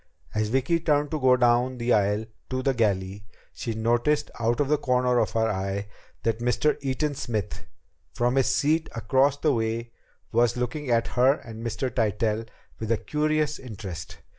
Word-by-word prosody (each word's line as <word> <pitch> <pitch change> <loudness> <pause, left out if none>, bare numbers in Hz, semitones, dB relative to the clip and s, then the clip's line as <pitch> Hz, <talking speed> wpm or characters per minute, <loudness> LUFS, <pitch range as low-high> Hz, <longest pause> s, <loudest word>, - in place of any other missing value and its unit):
As 105 0 0
Vicki 135 +7 +1
turned 150 -3 +1
to 155 - -1
go 130 -1 +5
down 125 +1 +3
the 120 0 +1
aisle 105 +1 +2 0.2
to 130 0 -2
the 135 - +2
galley, 100 -3 -1 0.3
she 115 -2 -4
noticed 120 +7 +1
out 115 +1 +1
of 145 - +2
the 150 0 +2
corner 125 -2 +2
of - - +1
her 110 0 +2
eye 100 0 -2 0.3
that 115 0 0
Mr. 125 +5 +1
Eaton 140 +2 -1
Smith, 110 -7 -4 0.4
from 120 +1 +1
his 135 -2 +3
seat 155 +3 +1
across 135 +4 +2
the 150 0 +2
way, 115 0 -2 0.4
was 120 +1 +2
looking 125 +3 -3
at 115 -1 +2
her 130 +3 +4
and 115 -5 -10
Mr. 120 +3 -2
Tytell 110 0 0 0.3
with 110 0 -3
a 115 - +3
curious 150 +1 0
interest. 100 -8 -8
120 Hz, 170 wpm, -26 LUFS, 110-135 Hz, 0.4 s, go